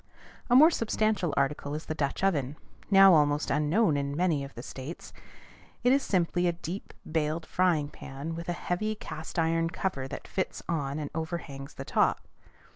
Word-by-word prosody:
A 245 - +5
more 310 +6 +8
substantial 215 - 0
article 145 +1 0
is 155 - -6
the - - -3
Dutch 150 +2 -2
oven, 145 -8 +1 0.3
now 195 -1 +8
almost 150 -1 +3
unknown 150 +4 +2
in 140 0 -2
many 165 -5 +1
of 140 - -9
the 120 - -7
States. 135 +7 -8 0.7
It 250 - +5
is 280 - +3
simply 175 -3 +1
a 175 - +2
deep, 175 +3 -7
bailed 160 +1 -1
frying 170 -6 +2
pan 140 +5 -7
with 170 +1 -6
a - - +1
heavy 215 +5 -2
cast 160 -6 -8
iron 165 0 +2
cover 165 -7 -3
that - - -8
fits 190 - -3
on 145 -4 -1
and 150 -2 -4
overhangs 160 -4 -5
the - - -7
top. - - +1
165 Hz, 175 wpm, -29 LUFS, 145-185 Hz, 0.7 s, more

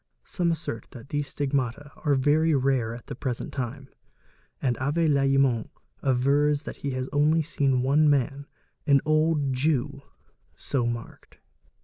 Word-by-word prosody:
Some 175 -2 -1
assert 155 -9 -4
that 125 +2 -11
these 145 -1 -2
stigmata 140 0 -2
are 145 -2 +1
very 150 +4 +3
rare 130 -4 +1
at 120 - -11
the - - -7
present 125 -1 -4
time, 130 +1 -5 0.7
and 125 -2 0
Avé 150 +5 +1
Lallemant 135 -5 +2 0.3
avers 140 +3 +2
that - - -7
he 140 - -4
has 130 0 -3
only 155 +3 +3
seen 135 -5 +1
one 150 +3 +4
man, 140 0 0 0.4
an 140 -2 +5
old 155 -3 +2
Jew, 140 0 0 0.6
80 125 -4 -1
marked. 120 -1 -7
140 Hz, 140 wpm, -26 LUFS, 130-145 Hz, 0.7 s, an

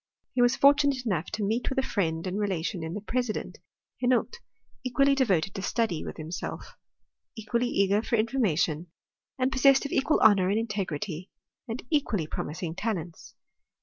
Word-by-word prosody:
He 250 - +2
was 245 +2 +4
fortunate 280 -2 +4
enough 180 -6 -1
to 215 - -3
meet 225 +4 0
with 265 - -4
a 265 - +2
friend 165 -8 -1
and 190 +2 -2
relation 185 -3 -2
in 160 +1 -4
the 205 - -4
president, 240 +1 -3 0.4
Henault, 255 - +1 0.4
equally 275 +2 +3
devoted 200 -9 +1
to 195 - -5
study 200 -4 -1
with - - -7
himself, 160 +2 -6 0.6
equally 235 +2 -1
eager 200 -2 +2
for 235 - 0
information, 185 - +1 0.5
and 260 0 +1
possessed 270 +1 +4
of 280 - -4
equal 295 +3 +2
honour 195 -4 +5
and 205 - +1
integrity, 195 -5 -3 0.4
and 230 +1 -5
equally 235 - +1
promising 160 +2 -4
talents. 180 -4 -5
215 Hz, 155 wpm, -28 LUFS, 180-255 Hz, 0.6 s, honour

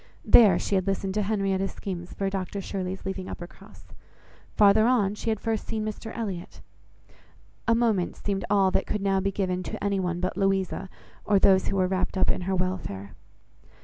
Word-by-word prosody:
There 205 -7 +7
she - - -3
had 190 0 +1
listened 195 0 -1
to 210 - 0
Henrietta's 195 -2 0
schemes 175 -3 -6
for 195 - -2
Dr 195 0 -3
Shirley's 190 -1 -4
leaving 190 -1 -4
Uppercross; 195 +4 -11 0.7
farther 210 +2 +5
on, 210 -6 +2
she 210 - -4
had 220 -2 0
first 225 -2 -2
seen 215 -1 -2
Mr 215 +1 -5
Elliot; 195 -6 -5 1.1
a 230 - +4
moment 220 -6 +1
seemed 195 -1 -3
all 195 -2 +4
that - - 0
could 210 -2 -2
now 195 -1 +2
be 195 +1 0
given 185 -2 -1
to - - -6
any 200 -1 +1
one 175 -2 -1
but 185 +1 -2
Louisa, 195 -1 0 0.3
or 205 - +3
those 190 -1 +4
who 195 - -1
were 185 -1 +3
wrapt 185 +1 -1
up 185 - +3
in - - -2
her 190 - +1
welfare. 180 - -3
195 Hz, 185 wpm, -26 LUFS, 185-205 Hz, 1.1 s, There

